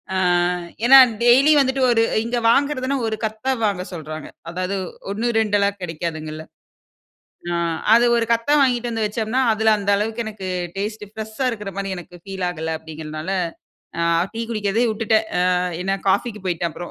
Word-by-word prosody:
ஆ - - +1 0.7
ஏனா 270 +2 +10 0.2
டெய்லி 260 +5 +6
வந்துட்டு 265 -1 +1
ஒரு 225 -1 +3 0.2
இங்கு 240 +1 -1
வாங்கறதுன்னா 275 0 +1
ஒரு 220 - -2
கத்த 220 +2 -6 0.2
வாங்க 195 -3 -1
சொல்றாங்க. 155 -2 -7 0.2
அதாவது, 185 +3 -3 0.4
1, 220 +4 -2
2 200 -2 +1
கிடைகாதுங்கள. 160 -2 -5 1.1
அ - - 0 0.4
அது 235 +1 +5
ஒரு 230 - +1
கத்தா 230 +5 +1
வாங்கிட்டு 245 -2 +1
வந்து 225 -1 -1
வெச்சோம்னா, 220 +4 -1
அதில 220 0 +3
அந்த 200 0 -3
அளவுக்கு 225 +3 -2
எனக்கு 210 -3 -6 0.3
டேஸ்ட் 210 +2 -4
ப்ரெஷா 220 +4 -3
இருக்கிற 210 -3 -6
மாரி 195 0 -3
எனக்கு 175 0 -11
பீல் 190 -2 -3
ஆகல 160 -2 -3
அப்டிங்கிறனால, 155 +1 -7 0.7
ஆ - - +1 0.3
டீ 230 - -2
குடிக்கிறதே 215 +1 0
உட்டுட்டேன். 220 0 +1 0.2
அ - - +3 0.3
ஏன்னா 195 +1 0
காபிக்கு 210 +3 0
போயிட்டேன் 170 -1 -1
அப்றோம். 175 +2 -8
210 Hz, 155 wpm, -21 LUFS, 180-230 Hz, 1.1 s, ஏனா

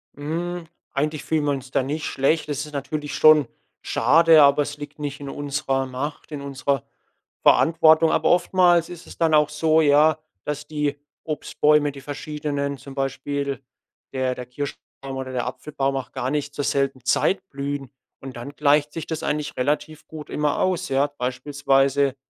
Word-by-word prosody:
Hm, 165 +4 -4 0.3
eigentlich 150 +1 -1
fühlen 155 -2 0
wir 145 - +2
uns 135 -2 -5
da 130 - +1
nicht 150 +3 -3
schlecht. 150 +4 0
Es 145 0 -2
ist 150 - -12
natürlich 145 +1 -4
schon 155 -3 +6 0.3
schade, 160 +6 +5
aber 140 +1 +5
es 145 +1 -7
liegt 145 +1 -9
nicht 145 -1 -4
in 140 -1 -7
unserer 140 -1 -2
Macht, 135 +5 -6
in 145 - -5
unserer 140 -1 -2 0.6
Verantwortung. 160 0 +5
Aber - - +2
oftmals 175 -1 +3
ist 175 -1 -10
es - - -12
dann 165 -2 +2
auch 150 -1 +4
so, 155 +1 +2
ja, 150 +1 +5 0.3
dass 150 0 -4
die 150 -2 -2 0.3
Obstbäume 150 -1 +1
die 140 -1 -11
verschiedenen, 145 0 -4
zum 135 0 -11
Beispiel 140 0 -3 0.5
der 130 -1 0
der 125 - -7
Kirschbaum 135 +1 -7
oder 130 -1 -5
der 125 -2 -1
Apfelbaum 135 +1 -3
auch 135 - -6
gar 130 +2 -2
nicht 145 -1 -2
zur 145 - -2
selben 135 -2 0
Zeit 190 +8 +1
blühen. 140 -1 -4 0.3
Und 135 -1 -8
dann 120 +4 -7
gleicht 150 0 +2
sich 165 - -5
das 160 -2 -4
eigentlich 150 0 -2
relativ 150 +3 -2
gut 155 -2 -9
immer 150 0 0
aus, 185 -5 0
ja. 135 +2 +2
Beispielsweise, 135 +1 +1
145 Hz, 170 wpm, -23 LUFS, 135-155 Hz, 0.6 s, schon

